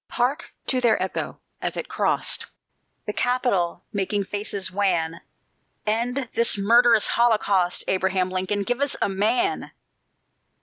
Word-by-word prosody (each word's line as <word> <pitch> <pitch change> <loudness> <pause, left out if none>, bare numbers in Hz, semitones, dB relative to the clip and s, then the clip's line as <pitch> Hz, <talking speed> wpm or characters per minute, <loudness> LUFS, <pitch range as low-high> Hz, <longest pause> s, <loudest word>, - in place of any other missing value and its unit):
Hark 255 +5 -1
to 255 -1 +1
their 235 -3 +3
echo, 185 - -3 0.2
as - - -2
it - - -4
crost - - +1 0.6
The 210 - -3
Capital, 210 -10 0
making 200 0 0
faces 200 -1 -4
wan: 170 -4 0 0.6
"End 240 +5 -1
this 230 -2 +3
murderous 230 +2 +5
holocaust; 205 -6 +2
Abraham 185 -1 +1
Lincoln, 185 +2 -1
give 245 +6 -2
us 285 -2 +1
a - - +1
MAN! 220 - 0
205 Hz, 125 wpm, -24 LUFS, 190-240 Hz, 0.6 s, murderous